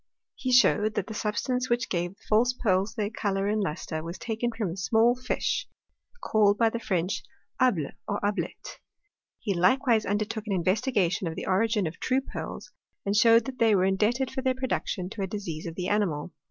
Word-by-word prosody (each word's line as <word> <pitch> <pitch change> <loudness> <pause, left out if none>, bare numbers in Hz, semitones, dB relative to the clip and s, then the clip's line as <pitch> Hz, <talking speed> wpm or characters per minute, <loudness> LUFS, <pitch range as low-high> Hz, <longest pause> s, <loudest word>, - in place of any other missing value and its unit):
He 255 - -3
showed 215 -4 +4
that - - -1
the 220 - -7
substance 250 +4 -1
which 240 0 +1
gave 175 +1 -2
the - - -28
false 235 +4 +3
pearls 200 -3 0
their 210 -2 -2
colour 195 -3 -1
and 210 +1 +1
lustre, 155 -3 -3
was 170 +3 -6
taken 230 +1 -2
from 220 -6 -3
a - - -5
small 225 +5 +3
fish 255 0 -2 0.6
called 205 -1 +3
by 225 0 +3
the 235 - -3
French 185 -4 -1 0.4
able, 190 - +2 0.2
or 205 -1 -1
ablette. 205 0 -3 0.6
He 205 - -2
likewise 225 +6 +3
undertook 215 +2 -2
an 205 - 0
investigation 190 0 +1
of 160 - -4
the - - -5
origin 210 +1 +2
of 160 +2 -5
true 260 +1 +1
pearls, - - -7 0.3
and 200 +1 0
showed 230 +1 +6
that 260 -2 -7
they 225 -2 +5
were 185 -1 +3
indebted 215 +7 +1
for 265 - -3
their 260 -1 +1
production 245 -7 -2
to 215 - -6
a 190 - -1
disease 180 -6 -5
of 165 - -6
the 180 0 -3
animal. 180 -7 0
210 Hz, 195 wpm, -27 LUFS, 190-235 Hz, 0.6 s, showed